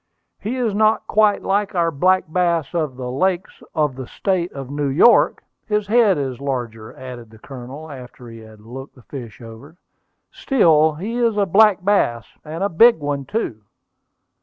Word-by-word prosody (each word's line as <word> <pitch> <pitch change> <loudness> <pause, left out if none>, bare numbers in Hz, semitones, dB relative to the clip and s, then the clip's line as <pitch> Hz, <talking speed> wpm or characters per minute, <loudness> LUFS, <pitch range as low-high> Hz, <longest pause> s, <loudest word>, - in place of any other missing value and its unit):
"He 225 +5 -4
is 235 -5 -1
not 215 +1 +2
quite 210 -1 +2
like 200 0 -1
our 170 -1 +1
black 185 +6 +2
bass 170 -1 0
of 155 -6 -2
the 125 -1 -5
lakes 185 +6 -2
of 150 -4 0
the 130 -2 -8
State 185 +1 -2
of 135 -1 -8
New 145 0 -2
York; 155 - +4 0.2
his 210 -1 0
head 215 -3 +3
is 130 -4 -4
larger," 120 -5 -4
added 125 -3 -10
the 110 - -16
Colonel, 135 +5 -10
after 125 -2 -11
he 115 -1 -11
had 110 -1 -15
looked 130 +5 -10
the 125 - -18
fish 120 -4 -10
over. 115 +8 -13 0.5
"Still 160 - +3
he 210 +9 -5
is 230 -3 +1
a 205 - +2
black 195 0 +4
bass, 120 - +1 0.2
and 160 +4 -5
a - - +2
big 230 +7 +5
one 145 -2 -4
too." 170 - -4
155 Hz, 175 wpm, -20 LUFS, 130-200 Hz, 0.5 s, big